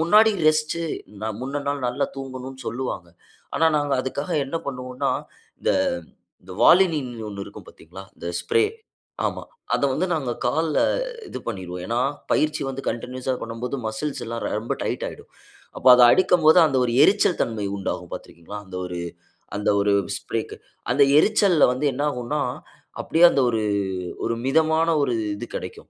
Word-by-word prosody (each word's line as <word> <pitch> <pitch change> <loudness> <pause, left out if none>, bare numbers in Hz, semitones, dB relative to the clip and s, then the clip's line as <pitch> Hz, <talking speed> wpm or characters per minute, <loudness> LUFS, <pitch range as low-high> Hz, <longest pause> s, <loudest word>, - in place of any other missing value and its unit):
முன்னாடி 210 +7 +5 0.2
ரெஸ்ட் 155 +1 +1 0.6
முன்ன 140 +2 -3
நாள் 140 -2 -2
நல்லா 125 - -1
தூங்கணும்னு 130 -1 -7
சொல்லுவாங்க. 120 -7 -4 0.5
ஆனா 160 - +4
நாங்க 145 -1 0
அதுக்காக 140 +2 -4
என்ன 155 +5 -3
பண்ணுவோம்னா 125 -1 -2 0.5
இந்த - - +2 0.7
இந்த 90 +1 -11
Volini 175 -3 +6 0.3
1 100 -1 -6
இருக்கும் - - -12
பார்த்தீங்ளா? 95 - -12
இந்த - - -8 0.2
ஸ்ப்ரே. 85 - +3 0.6
ஆமா. - - -4 0.3
அத - - +1
வந்து 175 +8 0
நாங்க 140 -6 -2
கால்ல 155 +5 +1 0.5
இது - - -6
பண்ணிருவோம். 90 -5 -5
ஏன்னா 115 +3 -1 0.3
பயிற்சி 155 0 +1
வந்து 135 0 -4
கன்டின்யூஸ்ஸா 130 +2 -3
பண்ணும்போது 115 +3 -4
மஸ்ல்ஸ்லாம் 115 0 -4 0.2
ரொம்ப 115 - -2
டைட் - - -2
ஆயிடும். - - -12 0.5
அப்போ - - +3
அத 125 - +6
அடிக்கும்போது 180 -3 +5
அந்த 140 -4 0
1 120 - -1
எரிச்சல் 195 -2 +3
தன்மை 110 -3 -2
உண்டாகும் 90 -3 -4
பார்த்து - - -7
இருக்கிறீங்ளா? 85 +5 -9
அந்த 95 -1 -8
1 90 -1 -5 0.6
அந்த 105 - -2
1 100 0 +2 0.3
ஸ்ப்ரேக்கு. - - -4 0.4
அந்த 140 +3 +4 0.2
எரிச்சல்ல 200 -6 +4
வந்து 130 +4 -1
என்ன 140 +3 -2
ஆகும்னா 140 +3 -2 0.6
அப்டியே 165 +2 +3
அந்த 140 - +1
1 115 -2 0 0.6
1 115 - 0
மிதமான 160 +3 +3
1 125 - 0 0.2
இது 100 - -6
கெடைக்கும். - - -7
130 Hz, 150 wpm, -23 LUFS, 115-155 Hz, 0.7 s, Volini